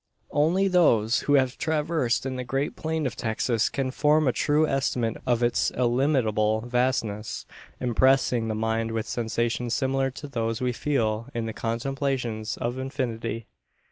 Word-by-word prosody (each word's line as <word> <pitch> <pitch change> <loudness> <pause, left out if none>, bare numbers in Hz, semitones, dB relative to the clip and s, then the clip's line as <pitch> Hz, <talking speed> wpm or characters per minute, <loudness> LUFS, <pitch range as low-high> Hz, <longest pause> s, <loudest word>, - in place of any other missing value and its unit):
Only 170 +7 +3
those 120 - +4
who 145 - +6
have 130 -1 +2
traversed 155 -5 0
the 130 -1 -3
great 135 +3 -2
plain 160 -1 -2
of 130 - -2
Texas 110 0 0
can 135 -2 -2
form 150 +2 +3
a - - +4
true 150 +5 +2
estimate 125 -5 0
of 120 -1 +2
its 120 - +2
illimitable 120 -4 +2
vastness; 120 -3 -1 0.3
impressing 125 -1 +2
the 110 - -1
mind 110 +1 0
with 110 -1 -2
sensations 115 +1 -1
similar 135 0 +1
to 145 +3 -8
those 115 -4 -2
we 125 -1 0
feel 115 -5 -1
in 115 -1 -1
the 110 - -4
contemplation 120 -1 -2
of 120 +2 -3
infinity. 115 -4 -3
125 Hz, 145 wpm, -26 LUFS, 115-135 Hz, 0.3 s, who